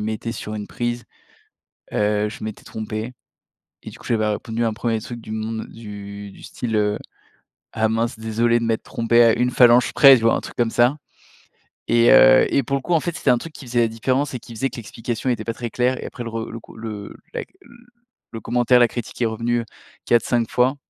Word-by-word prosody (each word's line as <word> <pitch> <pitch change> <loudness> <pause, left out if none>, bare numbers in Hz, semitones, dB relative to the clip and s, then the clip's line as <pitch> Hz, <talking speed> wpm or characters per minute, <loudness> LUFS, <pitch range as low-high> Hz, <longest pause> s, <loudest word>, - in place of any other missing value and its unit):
mettais 110 +2 -3
sur 110 -2 -6
une 105 -1 -5
prise, 120 0 -3 0.9
heu, 105 0 +1
je 105 - -9
m'étais 110 -1 -6
trompé, 110 +2 -5 0.7
et - - -8
du - - -13
coup - - -14
j'avais 110 -2 +1
répondu 110 +2 -2
un 110 -2 0
premier 115 0 -1
truc 120 +2 -8
du 110 - -11
monde 110 0 -4
du 100 -2 -9
du - - -15
style, 115 -2 -5
heu: 105 0 +1 0.7
«Ah 110 0 +1
mince 115 +1 -1
désolé 115 +1 +1
de - - -2
m'être 115 -1 0
trompé 115 +1 +3
à 115 -1 +5
1 125 +1 +2
phalange 120 0 +5
près», 135 -2 +9
tu 115 - -3
vois? 115 - +4
Un - - -1
truc - - -10
comme 120 -2 +1
ça. 120 +5 +3 0.9
Et 120 0 +5
heu, 130 0 +7
et 140 - +4
pour 140 - -1
le 135 - -6
coup 175 - -2
en 165 - +4
fait 175 +1 -3
c'était - - +2
un 120 - +4
truc 165 +3 -9
qui 140 - -11
faisait 120 0 0
la 115 - +3
différence 130 +6 -1
et - - -4
qui 115 - -12
faisait 135 +5 -1
que - - -11
l'explication 115 +2 -4
était 110 -2 -2
pas 115 - -2
très 120 -2 -5
claire 125 +2 0
et - - -7
après 120 - -7
le 115 - -5
re 115 0 -5
le 115 - -7
cou - - -16
le 110 -2 -7 0.2
la - - -3 0.9
le 115 - -5
commentaire, 120 +3 +3
la 120 - +6
critique 120 -1 -7
est - - +3
revenue, 115 +2 -1
heu, - - -9 0.4
4-5 120 0 +2
fois. 125 +3 +2
115 Hz, 225 wpm, -21 LUFS, 110-120 Hz, 0.9 s, près